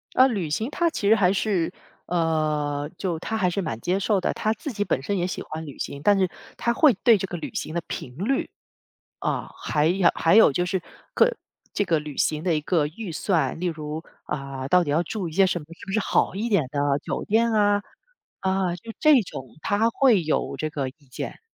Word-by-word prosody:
呃， 260 +1 +7
旅 190 -10 -2
行 220 - -1
他 340 +2 +1
其 205 -9 -1
实 220 - +7
还 190 -2 +3
是 195 -5 0 0.3
呃， 155 -3 0
就 175 -4 -2
他 220 +6 -3
还 185 -4 +2
是 190 +2 -1
蛮 115 -8 -4
接 185 +2 0
受 200 0 +1
的， - - 0
他 215 - 0
自 285 +5 -5
己 205 -1 -1
本 130 - -1
身 200 +6 -1
也 175 0 0
喜 185 - -4
欢 160 +1 -6
旅 140 - -10
行。 140 0 -5
但 205 -1 +5
是 185 -2 +2 0.3
他 235 - +1
会 300 -2 +6
对 230 -3 +7
这 195 - -3
个 175 - -5
旅 155 - -6
行 155 - -4
的 170 - 0
频 125 - -6
率， 255 +8 0 0.7
啊， - - -2
还 150 0 0
有 180 +1 +4
还 165 +3 +3
有 220 -10 +7
就 180 +5 0
是 185 -1 -1 0.3
各 - - +4 0.4
这 205 - +1
个 165 -3 +2
旅 150 -2 -7
行 155 +2 +1
的 175 -3 +2
一 150 - 0
个 150 -1 +1
预 180 +5 -7
算， 170 -1 0
例 180 - -2
如， 155 -1 -4 0.2
啊， 135 -2 -5
到 180 +1 +4
底 145 - -2
要 160 +4 +2
住 190 +1 -4
一 160 - -9
些 195 +2 +4
什 175 - 0
么 - - -11
是 170 - -12
不 195 - -5
是 220 - +2
好 190 - +1
一 220 +4 -2
点 185 -9 +3
的 145 -1 +1
酒 - - -3
店 230 +2 +2
啊？ 205 -1 +3 0.6
啊， 190 -2 0
就 225 +6 -9
这 300 -6 +6
种， 135 -9 -8
他 215 +3 +2
会 230 -6 +4
有 155 - -1
这 155 - -2
个 140 -3 -3
意 - - -16 0.2
见。 - - -6
180 Hz, 245 characters per minute, -25 LUFS, 155-205 Hz, 0.7 s, 呃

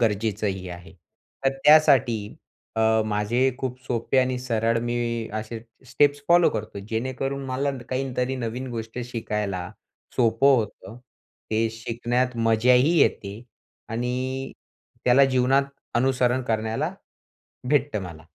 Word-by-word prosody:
गरजेचंही 105 -3 -1
आहे. 85 0 -10 0.5
तर 135 0 +2
त्यासाठी 135 -9 +5 0.4
अ, 110 0 +3
माझे 110 +5 +1
खूप 130 -2 -4
सोपे 120 +1 0
आणि 130 -1 +1
सरळ 115 -2 0
मी 120 -1 -2
असे 110 +1 -4 0.3
स्टेप्स 145 +3 +2
फॉलो 175 0 +6
करतो. 110 -2 -5
जेणेकरून 130 +4 -3
मला 135 +2 -1 0.2
काहीतरी 130 0 -2
नवीन 125 +2 -4
गोष्ट 115 0 -6
शिकायला 105 -6 -3 0.5
सोपं 125 +3 +4
होतं, 105 -2 -4 0.5
ते 110 +1 +1
शिकण्यात 120 +2 -2
मजाही 125 +7 +4
येते 105 -5 +1 0.5
आणि 125 +3 -3 0.5
त्याला 130 +3 +6
जीवनात 130 +1 +3 0.3
अनुसरण 125 0 +2
करण्याला 110 -2 -1 0.8
भेटतं 140 -7 +1
मला. 85 -3 -9
120 Hz, 110 wpm, -24 LUFS, 110-130 Hz, 0.8 s, फॉलो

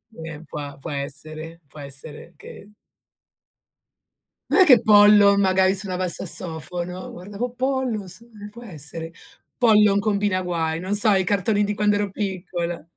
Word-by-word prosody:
Eh, 160 -2 -8
puà 145 -2 -7
può - - -8
essere. 155 +4 -7
Può 150 - -14
essere 145 +4 -7
che 205 - -13 1.8
Non 385 - +5
è - - +7
che 250 -6 +6
Pollon 205 -1 +6
magari 190 0 +2
suonava 185 -2 -1
il - - -2
sassofono? 175 +2 -3
Guardavo 205 +7 -6
Pollon, 255 -5 -2
sì, 215 +7 -9 0.2
può 235 +3 -13
essere. 165 -3 -8 0.4
Pollon 210 -4 +4
combina 205 -2 0
guai, 165 -2 -2
non 190 +3 -1
so 210 +1 +6
i 190 -1 +2
cartoni 205 +2 0
di 205 0 -2
quando 210 0 +1
ero 205 -1 -2
piccola. 180 -4 -4
190 Hz, 145 wpm, -22 LUFS, 165-210 Hz, 1.8 s, è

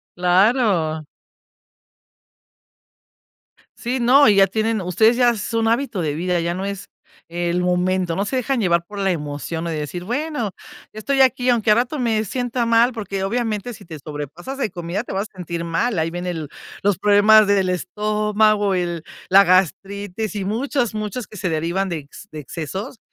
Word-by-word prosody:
Claro. 180 - +2 2.7
Sí, 245 +2 -3
no, 255 +2 +6
y 205 - +5
ya 195 0 +6
tienen 220 +1 0
ustedes 205 +7 +3
ya 245 -1 +4
es 220 0 -4
un 225 0 +2
hábito 235 -4 0
de 150 -2 -1
vida, 175 +1 0
ya 170 +1 -1
no 190 +1 -4
es 200 -1 -5 0.4
el 175 +1 -1
momento, 180 -1 0
no 200 - 0
se 260 - -3
dejan 255 0 0
llevar 170 -3 +2
por 205 +2 -10
la 195 -1 +1
emoción 150 +1 -4
de 165 - -3
decir: 155 +4 -4
"Bueno, 250 -2 -2 0.4
estoy 270 +6 -1
aquí, 255 -1 +3
aunque 230 -3 +3
al 210 - +6
rato 255 +5 -1
me 225 -3 +1
sienta 245 +2 -2
mal", 230 +2 +4
porque 200 -3 -4
obviamente 225 +1 -2
si 200 - -14
te 160 -3 -9
sobrepasas 150 - -7
de 220 - -1
comida 175 +5 -4
te - - -7
vas 200 +2 -2
a - - -25
sentir 170 -1 -4
mal. 175 +5 -1
Ahí 160 +1 0
viene 175 +1 -4
el, 160 -4 -5 0.3
los 200 -3 +1
problemas 210 +1 +6
del 195 -2 +2
estómago, 210 +2 +1
el 175 -3 -2 0.3
la 195 +1 +8
gastritis 195 +3 0
y 195 - -2
muchos, 240 +2 -1
muchos 215 +2 -4
que 215 - -13
se 185 -1 -2
derivan 170 +5 -1
de 170 -3 -3
ex 145 +7 -13
de 155 - -6
excesos. 190 - -6
200 Hz, 175 wpm, -21 LUFS, 175-225 Hz, 2.7 s, la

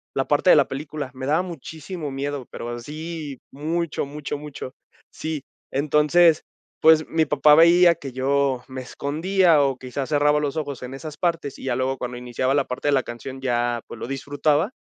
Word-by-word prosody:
la 135 - 0
parte 145 +5 +3
de - - +9
la 145 - +4
película. 145 0 -5
Me 130 0 -6
daba 155 +5 +2
muchísimo 160 -1 -7
miedo, 140 -1 -4
pero 120 - -6
así, 150 +3 -6
mucho, 160 +3 -2
mucho, 145 0 -5
mucho. 145 -3 -8 0.4
Sí, 155 -3 -4 0.3
entonces, 150 +3 +4 0.4
pues, 160 -1 +6
mi 160 -1 +1
papá 150 0 +5
veía 170 +2 +7
que 140 -3 -8
yo 135 0 0
me 130 0 -6
escondía 165 +5 +2
o 135 -2 0
quizás 130 +1 -5
cerraba 150 0 +3
los 145 +1 -2
ojos 145 -4 -4
en 125 +1 -7
esas 150 +2 -8
partes, 165 -5 -2
y - - -9
ya 130 -2 0
luego 130 +1 -1
cuando 125 -1 -5
iniciaba 125 +2 -1
la 140 -2 +2
parte 125 +3 -4
de - - +4
la 135 -2 +3
canción 130 +3 -7
ya, 120 -2 0
pues, 115 - -9
lo - - -5
disfrutaba, 145 - 0
145 Hz, 185 wpm, -23 LUFS, 130-155 Hz, 0.4 s, de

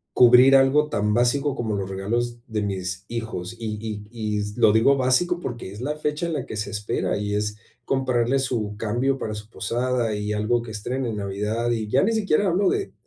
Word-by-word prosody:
cubrir 125 +2 +7
algo 135 +3 +4
tan 105 -5 0
básico 135 +4 +2
como 110 -5 -2
los 95 -1 -3
regalos 120 +5 -2
de 110 -4 -3
mis 95 -2 -3
hijos, 115 -4 -5
y 110 -2 -4
y 105 -2 -6
y 105 -3 -2 0.2
lo 110 - +6
digo 115 +6 +4
básico 140 +7 +2
porque 120 - -6
es 105 +4 -9
la 150 +3 -2
fecha 150 +2 -2
en 170 - -3
la - - -3
que - - -7
se 105 - -3
espera, 105 -1 -2
y 105 0 -2
es 105 0 -1 0.3
comprarle 130 -1 +1
su 115 -6 -2
cambio 120 +6 0
para 110 - -4
su 105 +1 -8
posada 120 -1 -1
y 105 0 -3
algo 110 +3 +1
que 120 - -9
estrene 120 +4 -3
en 110 - -3
Navidad. 105 +4 -2
Y 110 -2 -1
ya 130 +6 +3
ni 225 - +2
siquiera 205 -4 +2
hablo 190 +3 +2
de 400 -1 -2
115 Hz, 205 wpm, -24 LUFS, 105-135 Hz, 0.3 s, cubrir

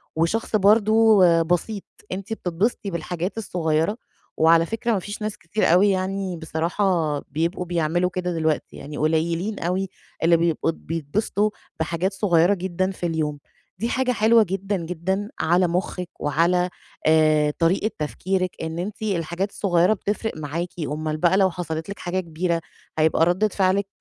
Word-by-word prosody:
وشخص 190 +8 0
برضو 215 +1 +5 0.2
بسيط، 180 +5 -1 0.3
أنتِ 195 +3 -4
بتتبسطي 200 +2 -1
بالحاجات 175 +4 -3
الصغيّرة، 170 -1 0 0.4
وعلى 165 +1 +5
فكرة 225 +4 -2
ما 195 - +1
فيش 205 +4 -7
ناس 215 0 -3
كتير 170 +2 +1
أوي 195 +3 +5
يعني 190 -1 -2
بصراحة 160 -1 0
بيبقوا 165 +6 -2
بيعملوا 175 +1 0
كده 180 -1 -3
دلوقتي، 160 -2 -1
يعني 145 +1 -8
قليّلين 165 +6 0
أوي 185 +2 -1 0.3
اللي 170 0 +5
بيبقوا 165 -1 +1
بيتبسطوا 165 +7 -1 0.3
بحاجات 170 +4 -1
صغيّرة 190 -2 +3
جدًا 185 0 -1
في 180 - -5
اليوم، 155 -3 -1 0.4
دي 230 - -1
حاجة 255 0 +1
حلوة 225 0 +5
جدًا، 195 +1 -2
جدًا 180 +4 -3
على 175 +2 +3
مخِّك 180 0 -2
وعلى 170 +5 +2 0.4
آآ، 155 -1 +4
طريقة 185 +6 +2
تفكيرِك، 185 +4 -1
إن 160 +1 -4
أنتِ 200 +4 -5
الحاجات 185 0 -2
الصغيّرة 180 0 +2
بتفرق 210 +2 -3
معاكِ، 155 +4 -3 0.2
أومّال 155 +2 -3
بقى 175 +4 +3
لو 190 -2 +4
حصلت 160 -1 -5
لِك 200 - -6
حاجة 180 +1 -2
كبيرة 170 0 -1 0.4
هيبقى 160 +1 +4
ردّة 185 +5 +2
فعلِك 195 0 +1
180 Hz, 145 wpm, -23 LUFS, 165-195 Hz, 0.4 s, برضو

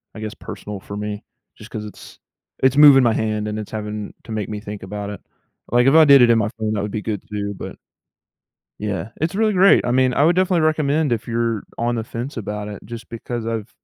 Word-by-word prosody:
I 110 - -8
guess, 110 0 -5
personal 105 -1 -8
for 100 - -9
me, 105 0 -5 0.3
just - - -12
'cause 105 - -5
it's 105 - -12 0.4
it's 130 +1 +3
moving 145 -3 +8
my 115 -2 +3
hand, 110 -1 -1
and 105 0 -4
it's 105 - -7
having 105 -1 -5
to - - -10
make 110 -3 -3
me 105 -1 -5
think 105 -2 -8
about 100 +1 -5
it. 105 - -7 0.5
Like, 120 +1 +3
if 135 - +5
I 160 -1 +8
did 140 -2 +8
it 120 - +6
in 115 - +5
my 110 - +1
phone, 110 -1 -2
that 105 - -1
would 105 0 -4
be 105 - -3
good 105 -2 -4
too, 100 -1 -3
but - - -7 1.0
yeah, 105 0 -3
it's 165 +4 -1
really 215 0 +2
great. 195 +1 +5
I 120 - 0
mean, 130 0 +3
I 140 - +3
would 170 +2 +4
definitely 185 -2 +2
recommend 155 -2 +1
if 115 -1 -1
you're 115 -2 -1
on 120 +1 0
the 115 - -2
fence 120 +5 -6
about 105 -1 -4
it, 105 -1 -8
just 115 -1 -8
because 115 0 -5
I've 115 -1 -3
115 Hz, 240 wpm, -21 LUFS, 105-130 Hz, 1.0 s, moving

